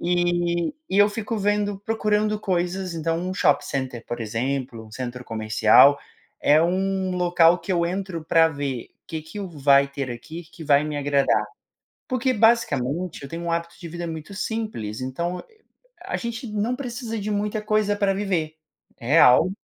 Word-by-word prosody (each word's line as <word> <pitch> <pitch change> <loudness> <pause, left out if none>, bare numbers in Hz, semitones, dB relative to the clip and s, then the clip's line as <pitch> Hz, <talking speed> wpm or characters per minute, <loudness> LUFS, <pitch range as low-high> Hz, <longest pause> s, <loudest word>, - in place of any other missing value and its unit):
Eh, 175 0 0 0.2
e 195 - +1
eu 205 0 +7
fico 215 +1 -4
vendo, 205 0 0
procurando 215 0 0
coisas, 180 -1 -1
então 165 0 -1
um 185 +2 -3
shopping 145 -6 +2
center, 130 -4 -4
por 120 - -5
exemplo, 120 +1 -3
um - - -16
centro 125 0 -6
comercial, 110 +5 +5 0.4
é 150 +2 +5
um 190 +1 0
local 175 -1 +4
que 170 +3 -4
eu 170 -1 +2
entro 185 -3 -4
para 165 0 +5
ver 140 -5 -4 0.2
que 160 -1 -5
que 160 +7 -8
o 195 - -5
vai 140 -3 +4
ter 140 -1 -4
aqui 160 +8 -9
que 165 - -10
vai 145 0 +4
me 150 -1 -4
agradar. 140 -1 +2 0.6
Porque, 255 -1 +1
basicamente, 185 - +1
eu 140 - -7
tenho 165 +3 -6
um 170 - -1
hábito 170 0 -3
de 170 - -7
vida 175 +1 -6
muito 160 +4 -7
simples 210 - -4
então 170 +8 -3
e 450 - -26
a - - -45 0.4
a - - -2
gente 235 +2 -5
não 215 +3 -1
precisa 240 -3 -5
de 210 +1 -3
muita 210 +1 -1
coisa 215 -1 +1
para 200 -1 +1
viver. 175 -6 -2 0.4
Real 130 +4 +5
170 Hz, 175 wpm, -24 LUFS, 145-205 Hz, 0.6 s, eu